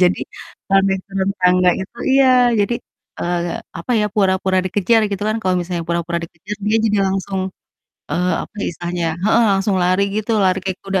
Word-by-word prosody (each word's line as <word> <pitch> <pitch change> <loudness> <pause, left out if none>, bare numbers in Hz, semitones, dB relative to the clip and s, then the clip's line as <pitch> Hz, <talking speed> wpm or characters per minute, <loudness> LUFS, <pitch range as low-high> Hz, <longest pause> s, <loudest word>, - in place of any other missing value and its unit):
Jadi, 180 - +2 0.5
kalau 195 0 +5
naik 190 -1 0
turun 195 0 -1
tangga 180 0 +4
itu 190 +5 -8 0.2
iya, 270 0 +5 0.3
jadi, 220 +4 +1 0.5
eee, 175 0 -1 0.2
apa 170 - -7
ya, 210 - +2
pura-pura 190 -2 +2
dikejar 205 +4 +2
gitu 200 -1 -4
kan, 215 - 0
kalau 185 -2 +1
misalnya 175 0 -2
pura-pura 170 0 -1
dikejar, 185 +6 -8
dia 215 +2 +3
jadi 210 -2 +2
langsung, 190 0 -2 0.7
eee, 180 +1 0
apa - - -11
ya - - -1
istilahnya 175 +1 -4
ya 160 - -1
heeh, 230 +2 +4
langsung 195 0 +1
lari 185 +2 +2
gitu, 215 +1 -2
lari 185 0 +2
kayak 190 -1 -3
kuda, 195 -1 0
190 Hz, 185 wpm, -19 LUFS, 180-200 Hz, 0.7 s, kalau